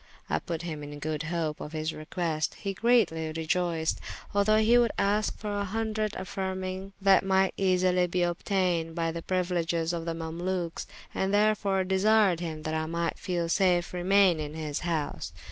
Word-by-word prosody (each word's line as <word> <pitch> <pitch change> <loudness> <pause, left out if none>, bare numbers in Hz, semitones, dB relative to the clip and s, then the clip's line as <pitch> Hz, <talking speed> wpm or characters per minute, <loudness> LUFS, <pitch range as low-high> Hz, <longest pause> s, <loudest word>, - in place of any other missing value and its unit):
I - - +2
put 170 -2 -5
him 160 -3 -5
in 145 0 -7
good 155 0 -3
hope 165 -3 -2
of 150 - -7
his 155 0 -2
request, 155 0 -2
he 195 -2 -4
greatly 190 -8 +2
reioyced, 160 0 0 0.4
although 205 +2 +4
he 220 +2 +4
would 235 -2 +3
ask 205 +1 +1
for 210 -1 -4
a 205 - 0
hundred, 215 +1 -2
affyrmyng 190 0 -4
that 195 -1 +5
might 190 0 +2
easily 185 -1 +2
be 180 +1 -1
obteyned 175 -2 0
by 165 -1 0
the 165 0 -5
priuileges 175 -2 0
of 165 -1 -3
the 165 -1 -2
Mamalukes, 170 +1 -3 0.3
and 190 0 0
therefore 205 -2 +2
desyred 190 -1 +3
hym 160 -3 -5
that 155 - -3
I 160 0 -1
might 170 0 -2
safely 180 0 +1
remayne 190 -2 +4
in 150 0 -5
his 155 -2 -3
house. 165 -4 -3
180 Hz, 165 wpm, -28 LUFS, 165-195 Hz, 0.4 s, that